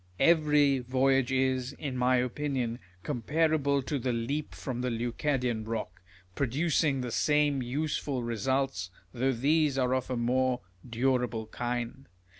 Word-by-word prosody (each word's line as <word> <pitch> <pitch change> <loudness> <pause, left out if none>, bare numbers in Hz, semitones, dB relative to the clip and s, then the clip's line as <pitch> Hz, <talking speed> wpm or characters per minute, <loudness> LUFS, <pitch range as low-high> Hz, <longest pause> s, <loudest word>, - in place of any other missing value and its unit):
Every 150 -4 +4
voy 130 +2 +2
age 135 -1 0
is, 130 0 +1
in 140 -2 -5
my 125 0 +3
opinion, 125 -1 -1 0.2
comparable 145 +1 +1
to 145 +1 -2
the 125 +1 -1
leap 135 +6 -3
from 125 -3 -4
the 125 - 0
Leucadian 120 0 -1
rock, 110 -5 -4 0.3
producing 140 - +1
the 125 -1 -4
same 150 +1 +2
useful 140 0 -2
results, 120 -4 -1 0.2
though 130 +2 +1
these 145 +3 +2
are 125 -1 +2
of 130 -1 -1
a 125 - -1
more 125 +1 +1 0.3
durable 120 -2 0
kind. 120 +3 -4
130 Hz, 135 wpm, -29 LUFS, 120-140 Hz, 0.3 s, Every